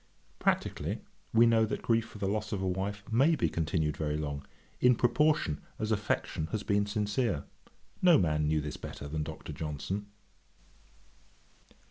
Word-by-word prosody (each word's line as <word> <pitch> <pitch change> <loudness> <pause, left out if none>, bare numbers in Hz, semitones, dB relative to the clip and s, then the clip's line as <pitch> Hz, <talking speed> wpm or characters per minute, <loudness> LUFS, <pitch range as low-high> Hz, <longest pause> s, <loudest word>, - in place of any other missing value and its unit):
Practically, - - 0 0.3
we 115 +1 +6
know 115 -1 +5
that 110 - -2
grief 115 -1 +2
for 110 - -11
the 100 - -1
loss 105 +2 -1
of 100 - -1
a 95 - -1
wife 100 +2 -2
may 140 +9 +5
be - - +1
continued 80 -2 0
very 75 0 -1
long, 70 -1 -3 0.4
in 125 0 +6
proportion 120 - +2 0.2
as 110 0 -2
affection 100 -6 -1
has 105 +5 -3
been 100 -1 +1
sincere. 105 - 0 0.6
No 175 -4 +7
man 75 - +2
knew 75 0 +2
this 75 0 -5
better 70 - -7
than 75 +1 -2
Dr. 75 - -6
Johnson. 80 +7 -4
100 Hz, 155 wpm, -31 LUFS, 75-110 Hz, 0.6 s, No